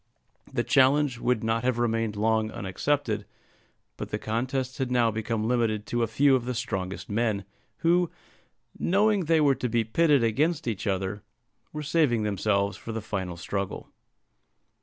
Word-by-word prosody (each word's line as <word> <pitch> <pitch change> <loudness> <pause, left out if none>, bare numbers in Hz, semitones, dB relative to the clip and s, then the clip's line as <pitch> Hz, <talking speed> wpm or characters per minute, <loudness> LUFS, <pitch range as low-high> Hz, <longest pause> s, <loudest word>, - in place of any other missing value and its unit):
The - - 0
challenge 135 -1 +3
would 120 -2 0
not 115 +1 0
have 125 -1 +1
remained 115 -2 0
long 110 +1 +1
unaccepted, 110 +3 -1 0.7
but - - -5
the - - -2
contest 130 +4 -2
had 130 -2 -1
now 120 -2 +3
become 110 0 -2
limited 115 -3 0
to 120 - -1
a 115 - +2
few 135 +5 +4
of 125 -2 -1
the 125 0 -3
strongest 95 -6 -4
men, 105 -2 0 0.4
who, 175 0 +4 0.7
knowing 200 0 +2
they 160 0 +3
were 145 -2 +5
to 125 -2 -3
be 115 0 +2
pitted 145 +3 +3
against 145 +7 +1
each 110 -2 -2
other, 95 +1 -1 0.5
were 150 0 -5
saving 145 -7 +2
themselves 100 -1 0
for 115 - -7
the 110 - -3
final 95 -4 -4
struggle. 100 +3 -4
115 Hz, 160 wpm, -27 LUFS, 105-135 Hz, 0.7 s, were